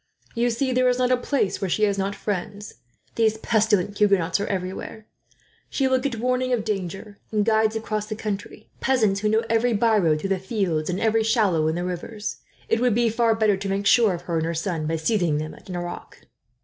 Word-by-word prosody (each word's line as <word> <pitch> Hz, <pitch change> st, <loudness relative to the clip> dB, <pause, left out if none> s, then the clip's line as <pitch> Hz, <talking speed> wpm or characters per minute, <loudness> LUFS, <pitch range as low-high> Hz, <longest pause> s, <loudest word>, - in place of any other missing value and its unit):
You 240 Hz, 0 st, +1 dB
see, 255 Hz, +3 st, -1 dB
there 255 Hz, 0 st, +3 dB
is 250 Hz, -, +1 dB
not 255 Hz, 0 st, +1 dB
a -, -, +6 dB
place 250 Hz, -4 st, -1 dB
where 195 Hz, -, -1 dB
she 215 Hz, -, 0 dB
has 200 Hz, -1 st, +3 dB
not 195 Hz, +1 st, -1 dB
friends. 205 Hz, +1 st, -4 dB, 0.4 s
These 220 Hz, -1 st, +2 dB
pestilent 210 Hz, -3 st, +1 dB
Huguenots 195 Hz, -4 st, +3 dB
are 200 Hz, -, -2 dB
everywhere. 190 Hz, +3 st, -5 dB, 0.6 s
She 270 Hz, -, +1 dB
will 260 Hz, 0 st, +2 dB
get 255 Hz, -2 st, -2 dB
warning 255 Hz, +1 st, 0 dB
of 230 Hz, -4 st, 0 dB
danger, 200 Hz, 0 st, -4 dB
and 210 Hz, -2 st, +1 dB
guides 220 Hz, 0 st, +2 dB
across 215 Hz, -1 st, -3 dB
the 215 Hz, -, -4 dB
country 210 Hz, 0 st, -5 dB
peasants 220 Hz, -7 st, +2 dB
who 210 Hz, +1 st, 0 dB
know 220 Hz, +2 st, +2 dB
every 230 Hz, +2 st, +2 dB
byroad 205 Hz, -8 st, +3 dB
through 195 Hz, -, -3 dB
the 195 Hz, -1 st, +1 dB
fields, 185 Hz, -6 st, -1 dB
and 180 Hz, +1 st, -1 dB
every 225 Hz, 0 st, +2 dB
shallow 205 Hz, -9 st, +2 dB
in 160 Hz, -, 0 dB
the 175 Hz, +1 st, -2 dB
rivers. 205 Hz, +4 st, -5 dB, 0.3 s
It 225 Hz, -, +1 dB
would 245 Hz, -3 st, +2 dB
be 235 Hz, 0 st, +3 dB
far 230 Hz, 0 st, +2 dB
better 215 Hz, -3 st, +2 dB
to 195 Hz, +1 st, -4 dB
make 195 Hz, +1 st, -1 dB
sure 220 Hz, -4 st, +5 dB
of 175 Hz, -, -9 dB
her 170 Hz, -2 st, -2 dB
and 160 Hz, -, 0 dB
her 170 Hz, -, -2 dB
son, 165 Hz, -2 st, -2 dB
by 165 Hz, -, 0 dB
seizing 170 Hz, -2 st, +1 dB
them 155 Hz, +1 st, -4 dB
at -, -, -16 dB
Nerac." 175 Hz, -1 st, -7 dB
210 Hz, 215 wpm, -24 LUFS, 185-225 Hz, 0.6 s, a